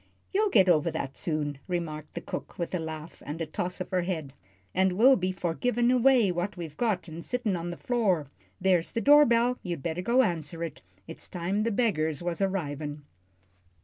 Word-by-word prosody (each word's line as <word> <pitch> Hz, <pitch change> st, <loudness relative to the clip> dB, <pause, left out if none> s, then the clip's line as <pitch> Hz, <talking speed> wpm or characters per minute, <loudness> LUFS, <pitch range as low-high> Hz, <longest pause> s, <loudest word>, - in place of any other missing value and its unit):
"You'll 420 Hz, +2 st, +3 dB
get 195 Hz, -, +5 dB
over 170 Hz, -2 st, +4 dB
that 140 Hz, -4 st, -4 dB
soon," 150 Hz, -4 st, -2 dB
remarked 155 Hz, -4 st, -4 dB
the 170 Hz, -, -3 dB
cook, -, -, -7 dB
with 170 Hz, +1 st, -3 dB
a 180 Hz, -, 0 dB
laugh 160 Hz, 0 st, -7 dB
and 150 Hz, +3 st, -6 dB
a 165 Hz, -, -1 dB
toss 175 Hz, +4 st, -3 dB
of 185 Hz, -, -5 dB
her 185 Hz, -1 st, +2 dB
head, 160 Hz, -6 st, -3 dB, 0.4 s
"and 190 Hz, 0 st, +2 dB
will 250 Hz, +8 st, +6 dB
be 185 Hz, -3 st, -1 dB
for 175 Hz, -2 st, -2 dB
givin' 240 Hz, +5 st, +1 dB
away 250 Hz, -5 st, +4 dB
what 175 Hz, +3 st, -3 dB
we've 160 Hz, -4 st, -6 dB
got 215 Hz, -5 st, 0 dB
an' 165 Hz, +1 st, -7 dB
sittin' 235 Hz, -2 st, -1 dB
on 170 Hz, 0 st, -4 dB
the 175 Hz, -, -6 dB
floor. 205 Hz, -11 st, +1 dB, 0.3 s
There's 180 Hz, -3 st, +2 dB
the 230 Hz, -, 0 dB
door 295 Hz, +2 st, +7 dB
bell. 240 Hz, +1 st, +2 dB
You'd 170 Hz, -7 st, -5 dB
better 170 Hz, +1 st, -2 dB
go 240 Hz, +7 st, +4 dB
answer 165 Hz, -, -2 dB
it; 165 Hz, -, -6 dB, 0.3 s
it's 165 Hz, -, -9 dB
time 185 Hz, +3 st, -1 dB
the 230 Hz, -, +1 dB
beggars 175 Hz, -, 0 dB
was 175 Hz, +2 st, -2 dB
arrivin'." 150 Hz, -6 st, -2 dB
180 Hz, 200 wpm, -28 LUFS, 160-215 Hz, 0.4 s, door